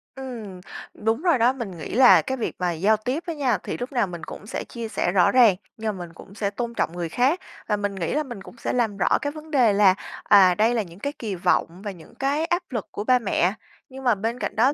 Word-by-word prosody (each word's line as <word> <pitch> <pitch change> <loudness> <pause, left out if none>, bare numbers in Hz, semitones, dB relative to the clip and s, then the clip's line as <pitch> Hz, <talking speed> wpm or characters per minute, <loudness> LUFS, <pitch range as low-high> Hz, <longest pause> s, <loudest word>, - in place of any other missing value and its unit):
Ừm, 225 -9 -7 0.3
đúng 225 +6 -1
rồi 345 -7 +3
đó. 240 +3 +4
Mình 210 -9 -6
nghĩ 155 - -7
là 255 -1 +8
cái 265 0 -3
việc 230 - -3
mà 180 -1 0
giao 195 +7 +2
tiếp 255 +9 -3
á 335 - -2
nha, 260 -7 +1
thì - - -4
lúc 245 +3 -5
nào 240 -6 +1
mình 175 -2 -8
cũng 205 - -9
sẽ - - -4
chia 230 -2 -7
sẻ 175 - -1
rõ 180 -2 +4
ràng 235 -7 +6 0.2
nhưng 215 -3 -3
mà 175 - -6
mình 165 - -15
cũng 195 - -14
sẽ 205 -2 -1
tôn 235 +3 -4
trọng 195 - -1
người 175 -2 -4
khác, 265 - +2 0.3
và 210 -1 +1
mình 205 -1 -2
nghĩ 170 -3 -2
là 305 - +1
mình 240 -8 -8
cũng 230 - -13
sẽ - - -3
làm 225 -5 0
rõ 185 - +3
cái 285 - -2
vấn 310 +1 -11
đề 245 -7 +4
là, 200 -2 +6 0.3
à, 190 -3 +6
đây 220 +4 +3
là 225 - +2
những 175 -1 -11
cái 285 +7 -3
kỳ 215 -5 -3
vọng 175 0 0
và 205 - -4
những 185 +5 -15
cái 280 +4 0
áp 350 +1 0
lực 230 -6 -4
của 205 - -4
ba 250 +2 +4
mẹ. 190 -4 +1 0.4
Nhưng 265 +1 -10
mà 245 -4 +3
bên 225 +5 -3
cạnh - - -3
đó 250 +6 +4
225 Hz, 270 wpm, -24 LUFS, 195-255 Hz, 0.4 s, là